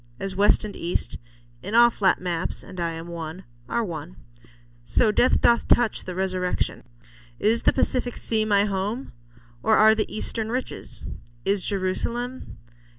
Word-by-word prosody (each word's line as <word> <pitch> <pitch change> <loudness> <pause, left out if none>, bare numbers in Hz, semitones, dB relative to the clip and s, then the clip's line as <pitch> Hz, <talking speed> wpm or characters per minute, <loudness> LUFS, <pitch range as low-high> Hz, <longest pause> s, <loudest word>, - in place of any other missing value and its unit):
As 195 -1 -3
west 205 +2 +3
and 205 - -7
east 175 +1 -2 0.4
In 205 +4 -4
all 235 0 +7
flat 195 -4 +2
maps—and 180 +1 -4
I 170 -1 -1
am 165 0 -7
one—are 165 - -5
one, 160 - -6 0.7
So 210 - +2
death 245 - +3
doth 235 0 +3
touch 240 -3 +2
the 185 - -5
resurrection. 185 -1 -1 0.5
Is 230 +2 +3
the - - +4
Pacific 250 -2 0
sea 220 -1 +1
my 205 -2 +3
home? 205 +6 -3 0.5
Or 220 - +4
are 220 0 +7
The 220 -1 -2
eastern 220 0 -3
riches? 255 +2 -3 0.4
Is 195 -1 +1
Jerusalem 235 +6 -3
200 Hz, 145 wpm, -24 LUFS, 180-225 Hz, 0.7 s, all